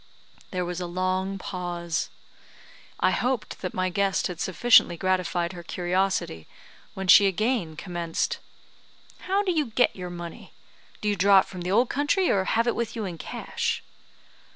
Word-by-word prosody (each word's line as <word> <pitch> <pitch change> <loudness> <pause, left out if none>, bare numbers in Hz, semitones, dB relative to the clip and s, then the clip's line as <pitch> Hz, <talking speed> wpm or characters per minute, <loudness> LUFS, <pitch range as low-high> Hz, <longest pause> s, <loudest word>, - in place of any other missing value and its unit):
There 180 -1 -2
was 180 +1 -4
a 175 - -3
long 185 +2 -1
pause. 175 -3 -3 0.9
I - - +3
hoped 250 -3 -2
that 185 - -4
my 185 0 +1
guest 195 +1 +1
had 180 -3 -4
sufficiently 190 -3 +4
gratified 185 -1 0
her 175 - -8
curiosity, 180 - -1 0.5
when 190 0 -4
she 200 +2 +8
again 200 -4 0
commenced: 170 -1 -2 0.9
"How 395 +2 +2
do 380 - +1
you 310 -5 +1
get 230 +2 +2
your 180 -1 -6
money? 175 -1 -8 0.5
Do 210 - -2
you 205 - +2
draw 195 +1 +6
it - - -7
from 185 -2 -8
the 180 - -3
old 235 +5 +3
country, 295 +7 +2
or 190 -1 +2
have 230 +4 +2
you 240 - +3
it - - -6
with 235 -2 -3
you 220 -2 -3
in 175 -3 -6
cash?" - - -3
185 Hz, 170 wpm, -26 LUFS, 175-215 Hz, 0.9 s, she